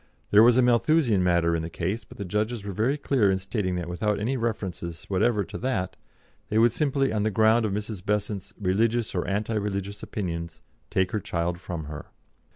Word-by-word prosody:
There 105 Hz, -, +8 dB
was 120 Hz, +1 st, +6 dB
a 130 Hz, -, +5 dB
Malthusian 120 Hz, -, +3 dB
matter 85 Hz, -2 st, +3 dB
in 80 Hz, -, -1 dB
the 80 Hz, -, -5 dB
case, 95 Hz, +6 st, -3 dB
but -, -, -14 dB
the 100 Hz, -, -4 dB
judges 105 Hz, +3 st, -2 dB
were 100 Hz, -, -3 dB
very 120 Hz, +9 st, +1 dB
clear 130 Hz, -8 st, +2 dB
in 95 Hz, -, +2 dB
stating 95 Hz, -1 st, -2 dB
that 85 Hz, -1 st, -3 dB
without 100 Hz, +4 st, -1 dB
any 120 Hz, +6 st, 0 dB
reference 110 Hz, -7 st, -2 dB, 0.3 s
whatever 105 Hz, +2 st, +2 dB
to -, -, -7 dB
that, 110 Hz, -8 st, -1 dB, 0.5 s
they 105 Hz, -, 0 dB
would 115 Hz, +1 st, +5 dB
simply, 135 Hz, -1 st, +1 dB
on 105 Hz, -, 0 dB
the 110 Hz, -, +2 dB
ground 110 Hz, +2 st, +4 dB
of -, -, -3 dB
Mrs. 105 Hz, -2 st, -4 dB
Besant's 105 Hz, -1 st, -2 dB
'religious, 110 Hz, +4 st, +1 dB
or -, -, -1 dB
anti 105 Hz, +3 st, -1 dB
religious, 100 Hz, -1 st, -3 dB
opinions,' 85 Hz, -5 st, -5 dB, 0.3 s
take 95 Hz, -1 st, +1 dB
her 110 Hz, -, 0 dB
child 85 Hz, -1 st, -2 dB
from 85 Hz, -3 st, -5 dB
her." 75 Hz, 0 st, -8 dB
105 Hz, 200 wpm, -26 LUFS, 90-115 Hz, 0.5 s, There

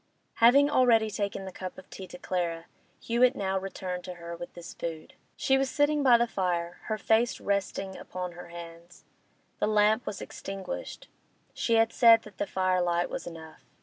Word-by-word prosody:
Having 275 Hz, +5 st, +6 dB
already 230 Hz, -5 st, +4 dB
taken 200 Hz, -1 st, -3 dB
the 190 Hz, -, -6 dB
cup 185 Hz, 0 st, -7 dB
of 185 Hz, -, -12 dB
tea 190 Hz, -, -8 dB
to 180 Hz, -, -10 dB
Clara, 170 Hz, -2 st, -2 dB, 0.3 s
Hewett 245 Hz, +3 st, +3 dB
now 190 Hz, -3 st, -1 dB
returned 185 Hz, -2 st, -5 dB
to 180 Hz, -1 st, -7 dB
her 170 Hz, 0 st, -7 dB
with 175 Hz, +1 st, -8 dB
this 175 Hz, 0 st, -9 dB
food. 160 Hz, -2 st, -6 dB, 0.2 s
She 270 Hz, 0 st, +2 dB
was 270 Hz, -1 st, 0 dB
sitting 290 Hz, +1 st, +2 dB
by 255 Hz, -4 st, +6 dB
the 235 Hz, -, +2 dB
fire, 175 Hz, -5 st, -2 dB
her 215 Hz, -, -2 dB
face 225 Hz, +3 st, +2 dB
resting 195 Hz, -1 st, -2 dB
upon 180 Hz, -1 st, -6 dB
her 175 Hz, 0 st, -10 dB
hands. 170 Hz, 0 st, -11 dB, 0.5 s
The -, -, +1 dB
lamp 215 Hz, +2 st, +3 dB
was 200 Hz, -, -4 dB
extinguished; 195 Hz, -1 st, -7 dB, 0.5 s
she 230 Hz, -, +1 dB
had 225 Hz, 0 st, +3 dB
said 230 Hz, -2 st, +7 dB
that 210 Hz, -3 st, -15 dB
the -, -, -1 dB
firelight 180 Hz, -2 st, +1 dB
was -, -, -5 dB
enough. 160 Hz, -2 st, -10 dB
190 Hz, 180 wpm, -28 LUFS, 175-225 Hz, 0.5 s, said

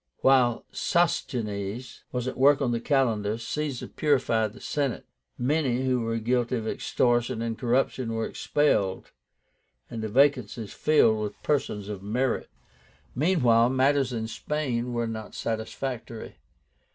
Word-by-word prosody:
While 125 Hz, -3 st, +4 dB
Sosigenes 115 Hz, -, -1 dB
was 125 Hz, 0 st, -2 dB
at 130 Hz, -, -3 dB
work 140 Hz, +2 st, +5 dB
on 130 Hz, -4 st, 0 dB
the 115 Hz, -, 0 dB
calendar, 115 Hz, -6 st, +1 dB
Caesar 135 Hz, +3 st, -3 dB
purified 120 Hz, -7 st, +1 dB
the -, -, -13 dB
Senate. 140 Hz, -5 st, -2 dB, 0.3 s
Many 130 Hz, -1 st, +1 dB
who 130 Hz, -2 st, +1 dB
were 115 Hz, 0 st, -1 dB
guilty 120 Hz, +2 st, 0 dB
of 110 Hz, -2 st, -3 dB
extortion 120 Hz, 0 st, +1 dB
and 115 Hz, -1 st, -2 dB
corruption 125 Hz, 0 st, 0 dB
were 115 Hz, 0 st, -1 dB
expelled, 105 Hz, -11 st, 0 dB, 0.8 s
and 115 Hz, -, -4 dB
the 110 Hz, -, -3 dB
vacancies 125 Hz, -4 st, +2 dB
filled 110 Hz, -8 st, +3 dB
with 105 Hz, -1 st, -5 dB
persons 110 Hz, -9 st, -1 dB
of 105 Hz, -2 st, -5 dB
merit. 120 Hz, +5 st, -1 dB, 0.6 s
Meanwhile 125 Hz, -7 st, +3 dB
matters 135 Hz, 0 st, +2 dB
in 110 Hz, -2 st, -3 dB
Spain 125 Hz, -1 st, -2 dB
were 120 Hz, -1 st, -1 dB
not 110 Hz, -1 st, -6 dB
satisfactory. 115 Hz, +1 st, -4 dB
120 Hz, 130 wpm, -27 LUFS, 110-135 Hz, 0.8 s, work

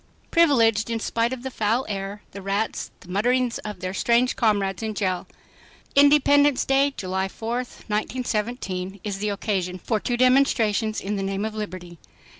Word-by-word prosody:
"Privileged" 235 Hz, -10 st, +4 dB
in 230 Hz, -1 st, -1 dB
spite 230 Hz, +1 st, 0 dB
of 255 Hz, -1 st, -5 dB
the 265 Hz, -, -4 dB
foul 225 Hz, +3 st, 0 dB
air, 200 Hz, 0 st, -5 dB
the 200 Hz, -, -8 dB
rats, 200 Hz, +3 st, -2 dB
and -, -, -36 dB
the 180 Hz, -, -7 dB
mutterings 245 Hz, +4 st, +1 dB
of 210 Hz, -1 st, -7 dB
their 185 Hz, 0 st, -3 dB
strange 235 Hz, +5 st, +2 dB
comrades 200 Hz, -4 st, +1 dB
in 220 Hz, -1 st, -3 dB
jail! 185 Hz, -2 st, -1 dB, 0.7 s
Independence 285 Hz, -1 st, +5 dB
Day, 275 Hz, +1 st, +3 dB
July 190 Hz, 0 st, -2 dB
4, 225 Hz, +4 st, -4 dB
1917, 215 Hz, -5 st, -3 dB
is 200 Hz, -2 st, -4 dB
the 210 Hz, +1 st, -1 dB
occasion 195 Hz, -3 st, -2 dB
for 215 Hz, +4 st, -1 dB
two 240 Hz, +3 st, -1 dB
demonstrations 235 Hz, -4 st, +3 dB
in 205 Hz, +1 st, -2 dB
the -, -, -2 dB
name 195 Hz, +1 st, -2 dB
of 220 Hz, -, -4 dB
liberty. 185 Hz, -5 st, -7 dB
215 Hz, 165 wpm, -24 LUFS, 195-245 Hz, 0.7 s, Independence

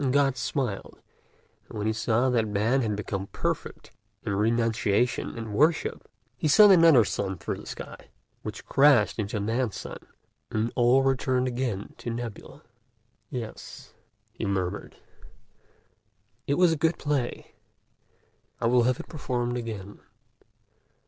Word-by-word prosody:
And 135 Hz, -3 st, +1 dB
God 140 Hz, -1 st, +3 dB
smiled; 125 Hz, -5 st, -3 dB, 0.7 s
and -, -, -8 dB
when 105 Hz, -, -2 dB
he 110 Hz, -, +1 dB
saw 115 Hz, +3 st, +1 dB
that 115 Hz, -3 st, +1 dB
Man 110 Hz, +6 st, +1 dB
had 110 Hz, -3 st, -1 dB
become 100 Hz, -1 st, -4 dB
perfect -, -, -4 dB, 0.3 s
in 105 Hz, -, -2 dB
renunciation 115 Hz, +2 st, +1 dB
and 110 Hz, -2 st, -5 dB
worship, 155 Hz, +8 st, +1 dB, 0.3 s
he 125 Hz, -, -1 dB
sent 205 Hz, +6 st, +8 dB
another 165 Hz, -, +7 dB
sun 95 Hz, -1 st, -3 dB
through 85 Hz, -, -4 dB
the -, -, -12 dB
sky, -, -, -9 dB, 0.3 s
which -, -, -7 dB
crashed 135 Hz, -7 st, +4 dB
into 105 Hz, 0 st, -2 dB
Man's 115 Hz, +2 st, -1 dB
sun; -, -, -7 dB, 0.5 s
and 110 Hz, +2 st, -1 dB
all 125 Hz, +2 st, +4 dB
returned 130 Hz, -1 st, +1 dB
again 120 Hz, -5 st, -3 dB
to -, -, -5 dB
nebula. 120 Hz, +4 st, -7 dB, 0.7 s
"'Yes,' 115 Hz, -4 st, -8 dB, 0.4 s
he 115 Hz, -, -7 dB
murmured, 95 Hz, -1 st, -2 dB, 1.5 s
'it 140 Hz, -, +2 dB
was 180 Hz, 0 st, +4 dB
a -, -, +1 dB
good 165 Hz, 0 st, +2 dB
play; 140 Hz, -5 st, -2 dB, 1.1 s
I -, -, -2 dB
will 120 Hz, 0 st, +4 dB
have 130 Hz, -, -1 dB
it -, -, -8 dB
performed 125 Hz, -6 st, -2 dB
again.'" 110 Hz, -4 st, -6 dB
120 Hz, 135 wpm, -27 LUFS, 105-130 Hz, 1.5 s, sent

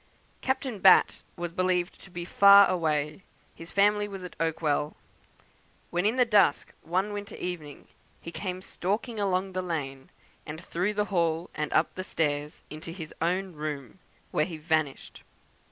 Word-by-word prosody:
Captain 260 Hz, -4 st, -2 dB
Batt 190 Hz, 0 st, +6 dB
was 175 Hz, -1 st, -4 dB
believed 180 Hz, 0 st, 0 dB
to -, -, -14 dB
be 175 Hz, -1 st, -6 dB
far 200 Hz, +2 st, +8 dB
away; 155 Hz, -2 st, -1 dB, 0.3 s
his 165 Hz, +1 st, -11 dB
family 205 Hz, +1 st, +3 dB
was 195 Hz, -2 st, -8 dB
at 180 Hz, -, -8 dB
Oakwell; 155 Hz, -2 st, 0 dB, 1.0 s
when 175 Hz, +3 st, +1 dB
in 225 Hz, -, +1 dB
the 250 Hz, -1 st, +4 dB
dusk, 205 Hz, -10 st, +3 dB
one 190 Hz, +5 st, -1 dB
winter 205 Hz, 0 st, -6 dB
evening, 160 Hz, -5 st, -6 dB, 0.3 s
he 170 Hz, -, -8 dB
came 185 Hz, 0 st, -5 dB
stalking 210 Hz, +5 st, -3 dB
along 190 Hz, -1 st, 0 dB
the 185 Hz, 0 st, -2 dB
lane, 140 Hz, -7 st, -4 dB, 0.3 s
and 155 Hz, +1 st, -7 dB
through 180 Hz, +4 st, -2 dB
the 210 Hz, 0 st, +1 dB
hall, 170 Hz, -1 st, 0 dB
and 150 Hz, 0 st, -3 dB
up 155 Hz, -, +2 dB
the 185 Hz, -, -5 dB
stairs, 150 Hz, -4 st, -2 dB
into 155 Hz, +2 st, -8 dB
his 165 Hz, -3 st, -8 dB
own 180 Hz, +2 st, 0 dB
room, 150 Hz, 0 st, -6 dB, 0.3 s
where 150 Hz, -, +2 dB
he 165 Hz, -1 st, -7 dB
vanished. 155 Hz, -3 st, -2 dB
175 Hz, 155 wpm, -28 LUFS, 155-195 Hz, 1.0 s, far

